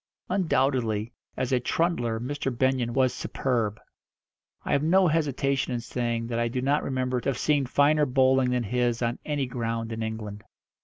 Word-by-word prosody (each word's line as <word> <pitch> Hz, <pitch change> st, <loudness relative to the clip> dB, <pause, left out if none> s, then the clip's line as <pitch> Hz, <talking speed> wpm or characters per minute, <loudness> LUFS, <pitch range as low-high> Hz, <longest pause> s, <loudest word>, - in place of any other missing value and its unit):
Undoubtedly, 130 Hz, -, +1 dB, 0.2 s
as 130 Hz, -, -1 dB
a 130 Hz, -, +3 dB
trundler 120 Hz, -5 st, 0 dB
Mr. 135 Hz, +3 st, -3 dB
Benyon 130 Hz, -1 st, +1 dB
was 130 Hz, 0 st, +2 dB
superb. 115 Hz, -5 st, -1 dB, 0.9 s
I -, -, -2 dB
have 140 Hz, -, +3 dB
no 180 Hz, +4 st, +4 dB
hesitation 140 Hz, -4 st, 0 dB
in -, -, -1 dB
saying 120 Hz, -1 st, -2 dB
that 115 Hz, 0 st, -2 dB
I 120 Hz, -, +1 dB
do 125 Hz, +2 st, -2 dB
not 140 Hz, +3 st, +1 dB
remember 130 Hz, -2 st, -1 dB
to -, -, -1 dB
have 130 Hz, -, -1 dB
seen 145 Hz, -2 st, +1 dB
finer 145 Hz, +3 st, +3 dB
bowling 130 Hz, 0 st, +3 dB
than 125 Hz, -1 st, 0 dB
his 120 Hz, +2 st, 0 dB
on 120 Hz, +1 st, -1 dB
any 145 Hz, -3 st, -1 dB
ground 115 Hz, -2 st, -3 dB
in 115 Hz, 0 st, -4 dB
England. 110 Hz, -2 st, -5 dB
125 Hz, 170 wpm, -26 LUFS, 115-140 Hz, 0.9 s, no